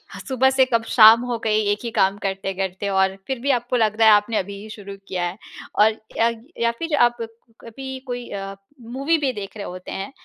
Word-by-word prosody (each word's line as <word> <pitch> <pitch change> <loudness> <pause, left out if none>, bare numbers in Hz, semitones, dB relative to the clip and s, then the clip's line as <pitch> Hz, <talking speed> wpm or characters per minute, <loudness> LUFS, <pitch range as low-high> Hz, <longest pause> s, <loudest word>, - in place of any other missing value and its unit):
ह - - -8
सुबह 265 -1 +3
से 265 0 +4
कब 230 -3 0
शाम 225 0 +8
हो 245 -1 -2
गई 215 -1 +1
एक 205 - -1
ही 235 - -3
काम 195 -2 +2
करते-करते 195 0 -3
और 190 0 +2
फिर 265 -2 -3
भी 275 +4 -3
आपको 245 0 -1
लग 215 -2 +1
रहा 225 - +6
है 215 - +8
आपने 210 +2 +2
अभी 200 +2 -3
ही 215 - -11
शुरू 200 -2 -9
किया 180 -2 -3
है। 175 +2 -5 0.4
और 215 +1 +6 0.3
या 230 - +3
ग 230 0 -12
या 235 0 +2
फिर 330 -2 -1
आप 240 -2 +3 0.4
कभी 265 +3 -8
कोई 245 -1 -5
अ, 195 0 -6 0.3
मूवी 270 +8 -1
भी 285 -4 0
देख 205 -1 -8
रहे 200 - -6
होते 180 0 -8
हैं 195 +4 -5
220 Hz, 230 wpm, -22 LUFS, 195-245 Hz, 0.4 s, शाम